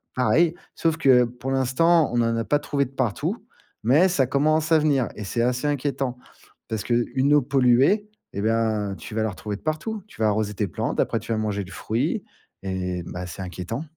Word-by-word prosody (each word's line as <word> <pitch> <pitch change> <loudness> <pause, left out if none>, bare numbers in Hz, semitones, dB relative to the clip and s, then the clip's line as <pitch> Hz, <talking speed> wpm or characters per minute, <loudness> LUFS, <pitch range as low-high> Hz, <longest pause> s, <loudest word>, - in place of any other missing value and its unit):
Pareil, 150 +8 +3 0.2
sauf 160 -1 0
que 130 -6 +5
pour 125 +2 -5
l'instant, 145 +5 +3
on 120 - +2
en 115 0 +1
a 115 - -1
pas 145 +8 +1
trouvé 140 -1 -1
de 130 - -12
partout. 125 -6 -2 0.4
Mais 145 +11 +5
ça 135 -7 +2
commence 155 +4 +1
à 160 - +7
venir 145 -6 +2
et 105 - -6
c'est 115 +4 -2
assez 125 +3 0
inquiétant. 135 -3 -1 0.5
Parce 110 -2 -3
qu'une 125 +4 +1
eau 150 - +6
polluée, 135 - +3 0.3
et 100 - -3
ben, 110 -2 0
tu - - -10
vas 110 - +1
la 110 - 0
retrouver 105 +2 -5
de - - -20
partout. 175 +7 -3
Tu 165 - -12
vas 110 - +4
arroser 105 0 0
tes 100 0 -1
plantes, - - -3
après - - 0
tu - - -7
vas 110 - -1
manger 105 -2 -1
le 95 - -13
fruit 110 +4 -2 0.4
et, 90 -2 -3
bah, 90 +1 -6
c'est 95 - -8
inquiétant. 90 - -5
125 Hz, 205 wpm, -24 LUFS, 110-145 Hz, 0.5 s, à